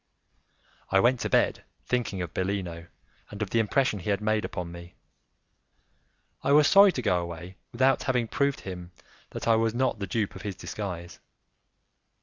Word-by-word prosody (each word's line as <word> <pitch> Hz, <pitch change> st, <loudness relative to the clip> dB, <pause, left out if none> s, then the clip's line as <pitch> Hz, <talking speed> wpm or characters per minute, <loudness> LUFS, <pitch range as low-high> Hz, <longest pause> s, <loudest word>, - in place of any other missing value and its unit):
I 95 Hz, -, +4 dB
went 120 Hz, +4 st, +3 dB
to -, -, -2 dB
bed -, -, +2 dB, 0.2 s
thinking 110 Hz, -7 st, -1 dB
of 85 Hz, -, -7 dB
Bellino 90 Hz, -3 st, -3 dB, 0.4 s
and 105 Hz, -, -9 dB
of 100 Hz, -, -6 dB
the 115 Hz, -, +2 dB
impression 110 Hz, 0 st, +1 dB
he 90 Hz, -, -5 dB
had 100 Hz, -, +1 dB
made 110 Hz, 0 st, 0 dB
upon 90 Hz, -3 st, -5 dB
me; 85 Hz, 0 st, -11 dB, 1.5 s
I 140 Hz, -, +3 dB
was 150 Hz, 0 st, +6 dB
sorry 200 Hz, 0 st, +7 dB
to 125 Hz, -, -3 dB
go 90 Hz, -5 st, +2 dB
away 85 Hz, +2 st, -7 dB, 0.2 s
without 130 Hz, +2 st, +3 dB
having 125 Hz, -3 st, 0 dB
proved 140 Hz, +3 st, 0 dB
to -, -, -18 dB
him 90 Hz, -2 st, -7 dB, 0.4 s
that -, -, -6 dB
I 115 Hz, -, +5 dB
was 115 Hz, 0 st, +1 dB
not 130 Hz, -3 st, 0 dB
the 100 Hz, -, -3 dB
dupe 105 Hz, +2 st, -1 dB
of -, -, -8 dB
his 100 Hz, -2 st, -5 dB
disguise. 90 Hz, -2 st, -6 dB
105 Hz, 175 wpm, -27 LUFS, 90-120 Hz, 1.5 s, sorry